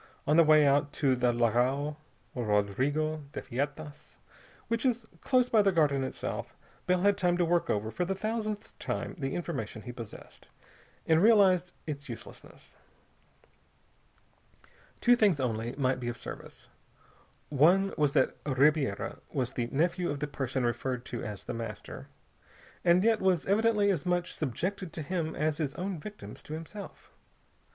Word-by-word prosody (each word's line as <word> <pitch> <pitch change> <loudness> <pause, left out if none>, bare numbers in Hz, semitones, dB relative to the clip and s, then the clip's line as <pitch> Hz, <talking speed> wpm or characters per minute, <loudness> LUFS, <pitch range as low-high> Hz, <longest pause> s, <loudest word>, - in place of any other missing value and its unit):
On 150 - +3
the 165 - +8
way 155 -1 +6
out 145 +1 +3
to 135 -4 +2
the 125 -1 +2
Lagao 125 +5 +1 0.4
Rodrigo 130 +8 0
de - - -3
Feitas, 145 +3 -5 0.5
which, 230 0 0
is 240 -3 +1 0.2
close 255 -2 +3
by 220 -3 +4
the 200 -1 +3
Garden 145 -6 +2
itself, 130 - -5 0.3
Bell 180 0 +2
had 200 +1 +3
time 175 -1 +2
to 175 - +2
work 170 +1 +1
over 105 +2 -1
for 180 - -1
the 190 +2 -1
thousandth 215 +1 -3
time - - -3
the 135 -1 -2
information 130 -11 -4
he 125 - -6
possessed, 115 -3 -11 0.6
and 160 0 +4
realize 190 -5 +5
its 145 -2 -6
uselessness. - - -11 2.2
Two 245 0 +6
things, 205 -10 +3
only, 115 -2 -2
might 130 -2 +1
be 120 - -4
of 120 - -5
service. - - -10 0.8
One 175 +7 +4
was 145 -2 +1
that 130 - +2
Ribiera 140 -5 +1
was 130 -3 -2
the 120 -2 -2
nephew 170 +7 0
of 145 - -3
the 150 - -1
person 135 -3 -2
referred 125 +1 -2
to 120 - -5
as 105 -3 -6
The - - -5
Master, 115 0 -7 0.8
and 175 +1 +5
yet 225 -1 +3
was 185 -4 +2
evidently 210 0 +3
as 185 - -1
much 175 0 0
subjected 170 - -3
to 155 - -5
him 160 0 -2
as 155 0 0
his 145 -4 -2
own 185 -1 -3
victims 210 +6 -9
to 150 - -8
himself. 165 +6 -9
155 Hz, 155 wpm, -30 LUFS, 130-185 Hz, 2.2 s, the